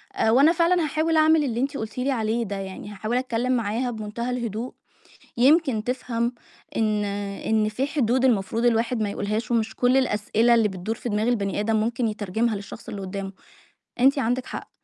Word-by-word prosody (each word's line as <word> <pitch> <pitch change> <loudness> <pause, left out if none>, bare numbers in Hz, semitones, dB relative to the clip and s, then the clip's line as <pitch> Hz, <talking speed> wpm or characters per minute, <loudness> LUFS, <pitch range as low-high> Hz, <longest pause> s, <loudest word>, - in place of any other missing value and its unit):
آآ، 220 - +2
وأنا 280 +7 +6
فعلًا 340 0 +2
هاحاول 315 +2 0
أعمل 310 0 +5
اللي 240 -3 -2
أنتِ 275 +2 -1
قُلتِ 220 +3 -6
لي 265 +2 0
عليه 230 -1 0
ده 200 -2 -4
يعني، 195 +1 -7
هاحاول 215 +4 -2
أتكلم 255 0 -1
معاها 240 +1 0
بمُنتهى 220 +2 -4
الهدوء. 235 -1 -3 0.6
يمكن 265 -4 +3
تفهم 245 -1 -1 0.4
إن 215 -2 +1
إن 205 +2 -1
في 255 +6 -1
حدود 260 -3 +1
المفروض 230 -1 +1
الواحد 230 0 +2
ما 205 - -1
يقولهاش، 215 +4 -3
ومش 220 -2 0
كل 250 +1 +3
الأسئلة 235 -1 +2
اللي 225 -2 +3
بتدُور 190 +4 -4
في 240 - -6
دماغ 215 +2 0
البني 205 -4 0
آدم 220 +1 +1
مُمكن 230 +1 0
يترجمها 215 +2 -1
للشخص 200 0 -9
اللي 200 - -5
قدامه. 195 0 -5 0.7
أنتِ 275 +2 +4
عندِك 245 +1 0
حق. - - -7
230 Hz, 180 wpm, -24 LUFS, 210-255 Hz, 0.7 s, وأنا